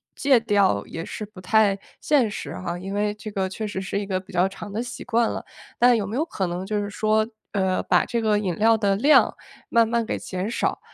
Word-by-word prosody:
戒 270 -4 +4
掉 200 - +2
也 165 - -6
是 215 - -6
不 200 -3 -13
太 205 0 +3 0.2
现 260 -8 +2
实 - - -6
哈， 175 -1 -4
因 195 +2 -6
为 205 0 0
这 215 +1 -8
个 190 -2 -2
确 215 +2 -4
实 190 -2 -4
是 195 +1 -2
一 205 - -4
个 185 -2 -2
比 190 - -16
较 180 +2 +2
长 200 +1 -9
的 220 +3 -2
习 245 - -7
惯 235 -1 +1
了。 - - -4 0.3
但 245 -1 +5
有 200 -2 -2
没 220 - -4
有 300 - +1
可 195 - -3
能 175 +2 -4
就 210 0 -1
是 205 - -4
说， 215 +1 +1 0.2
呃， 190 -2 0
把 - - +3
这 235 -1 -1
个 215 -1 +2
饮 185 -5 -2
料 225 +1 +4
的 200 -2 +2
量 285 +9 +5 0.3
慢 230 -1 +4
慢 230 0 0
给 - - -2
减 185 +3 -4
少， - - -1
210 Hz, 260 characters per minute, -24 LUFS, 190-225 Hz, 0.3 s, 但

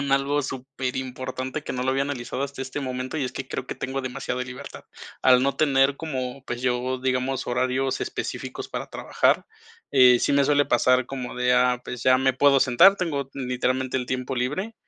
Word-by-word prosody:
con 140 -1 -2
algo 140 +2 +2
superimportante 130 +1 -4
que - - -5
no 125 - -2
lo 130 - +1
había 135 +1 +1
analizado 135 -2 -4
hasta 140 -1 -4
este 135 +2 -5
momento 130 +1 -4
y 145 - -1
es 125 - -4
que 130 0 -6
creo 125 - -4
que - - -5
tengo 135 +1 -3
demasiada 125 -1 -4
libertad. 125 0 -9 0.4
Al 125 -1 +6
no 140 +1 0
tener 140 -2 +3
como, 130 -4 -4
pues 120 -2 -5
yo, 125 +1 0
digamos, 130 +1 -1
horarios 130 +2 0
específicos - - -5
para - - -5
trabajar, - - +1 0.5
eh, 125 -3 +7
sí - - +1
me 140 0 +4
suele 145 0 +3
pasar 130 -2 +3
como 130 -2 -6
de: 125 0 +2
"Ah, 125 0 +3
pues 125 -1 -6
ya 130 0 +5
me 130 0 +2
puedo 140 +1 +4
sentar". 140 +11 +6
Tengo 145 -7 -2
literalmente 130 0 -1
el 125 -1 -2
tiempo 130 0 -3
libre 150 - -2
130 Hz, 195 wpm, -24 LUFS, 125-135 Hz, 0.5 s, eh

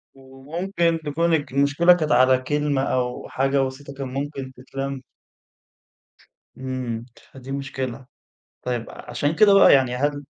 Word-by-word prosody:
وممكن 165 +6 -2
تكون 165 +3 0
الك 145 -4 0
المشكلة 145 +6 +4
كانت 155 -3 -1
على 130 0 +5
كلمة 145 +1 -1
أو 125 -2 -2
حاجة 135 +1 +1
بسيطة 135 +1 -5
كان 135 -1 -5
ممكن 135 -1 -4
تتلَم. 135 +1 -5 1.6
إمم، 130 -3 -4 0.3
فدي 135 0 -10
مشكلة، 135 -2 -5 0.6
طيب 120 -2 -3
ع - - -12
عشان 145 +3 -1
كده 210 0 +6
بقى 195 - +7
يعني 130 -2 +3
هل 145 +2 -1
135 Hz, 135 wpm, -23 LUFS, 130-145 Hz, 1.6 s, بقى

